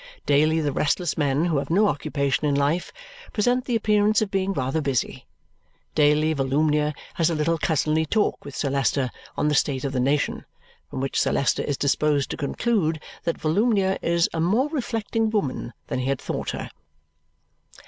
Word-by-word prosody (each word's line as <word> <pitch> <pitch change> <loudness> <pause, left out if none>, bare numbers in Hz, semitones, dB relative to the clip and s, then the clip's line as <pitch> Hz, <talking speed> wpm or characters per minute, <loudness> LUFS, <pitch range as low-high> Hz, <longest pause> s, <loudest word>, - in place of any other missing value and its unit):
Daily 155 +3 +3
the 145 -2 0
restless 155 +6 0
men 145 0 +1
who 165 -4 +1
have - - -5
no 200 +6 +4
occupation 145 -2 -1
in 140 - +1
life 145 +5 0 0.4
present 245 +3 +1
the 245 - -1
appearance 210 -1 +3
of 215 -2 -2
being 195 0 0
rather 135 -3 -1
busy. 135 -4 -2 0.7
Daily 150 +1 +3
Volumnia 150 +2 +1 0.2
has 165 -1 +1
a 165 - -1
little 160 +2 0
cousinly 155 0 +1
talk 215 +6 0
with 140 - -9
Sir 140 - -1
Leicester 135 -1 +1 0.3
on - - +1
the 150 - +2
state 135 -2 +1
of 135 -1 -2
the 130 - 0
nation, 140 +3 0 0.5
from - - -5
which 135 - 0
Sir - - +1
Leicester 140 - +1
is 145 - -2
disposed 145 0 +1
to - - -2
conclude 160 +1 0 0.3
that 170 - -1
Volumnia 195 +3 +1
is 170 0 +2
a 165 - -1
more 220 - +2
reflecting 225 -5 -1
woman 195 - -2
than - - -3
he 130 - -2
had 135 -1 0
thought - - -4
her. - - -5
155 Hz, 180 wpm, -24 LUFS, 140-195 Hz, 0.7 s, no